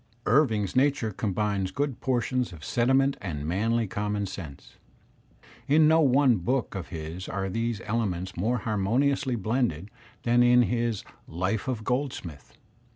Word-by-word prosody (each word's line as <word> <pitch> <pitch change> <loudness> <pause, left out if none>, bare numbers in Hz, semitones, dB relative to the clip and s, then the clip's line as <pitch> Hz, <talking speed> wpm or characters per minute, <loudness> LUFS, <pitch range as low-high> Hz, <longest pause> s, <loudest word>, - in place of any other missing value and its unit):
Irving's 110 -6 +2
nature 135 -4 +2
combines 100 -1 -1
good 140 +1 -3
portions 125 -1 0
of 80 -3 -10
sentiment 135 +3 +2
and 75 -6 -4
manly 110 +7 +1
common 105 +1 -2
sense. 80 -8 -9 0.9
In 155 +2 +5
no 160 +1 +5
one 135 -4 +4
book 120 +6 -1
of 95 -4 -5
his 80 +2 -6
are 95 -1 -2
these 115 +2 -2
ele 115 +1 0
ments 90 +1 -5
more 110 +8 0
harmoniously 125 +5 0
blended 110 - -1 0.3
than 120 +1 +3
in 120 0 +6
his 120 -3 -1 0.2
*'Life 95 +7 -2
of 120 -4 -2
Gold 130 +3 -1
smith." 75 -6 -10
110 Hz, 145 wpm, -27 LUFS, 95-125 Hz, 0.9 s, in